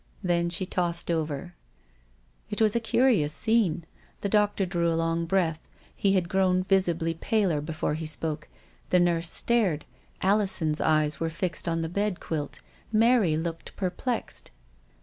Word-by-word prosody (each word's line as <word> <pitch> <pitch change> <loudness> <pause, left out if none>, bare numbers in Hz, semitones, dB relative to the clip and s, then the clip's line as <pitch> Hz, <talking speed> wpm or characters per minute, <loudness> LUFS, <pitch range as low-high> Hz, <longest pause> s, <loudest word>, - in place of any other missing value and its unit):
Then 170 -1 +1
she 180 +2 +1
tossed 175 -2 -1
over. 160 +1 -3 1.0
It 210 - -3
was 220 -1 +3
a - - +3
curious 225 - +2
scene. 175 -2 +1 0.4
The 200 - -1
doctor 205 -1 +2
drew 170 -2 0
a 165 - 0
long 165 0 0
breath; 165 -3 +1 0.4
he 195 -1 +2
had 185 -3 +1
grown 185 0 +2
visibly 175 -4 +1
paler 180 -3 0
before 155 0 -2
he 160 +1 -4
spoke. 155 0 -3 0.4
The 180 - +4
nurse 170 -1 +2
stared. 205 -11 +1 0.4
Alison's 190 -6 +1
eyes 155 -2 +2
were 165 - -1
fixed 170 +1 -1
on 165 0 -1
the - - -2
bed 200 +2 -1
quilt. 150 -3 -4 0.3
Mary 220 -7 +4
looked 165 0 -5
perplexed. 205 +6 -3
175 Hz, 150 wpm, -27 LUFS, 160-195 Hz, 1.0 s, The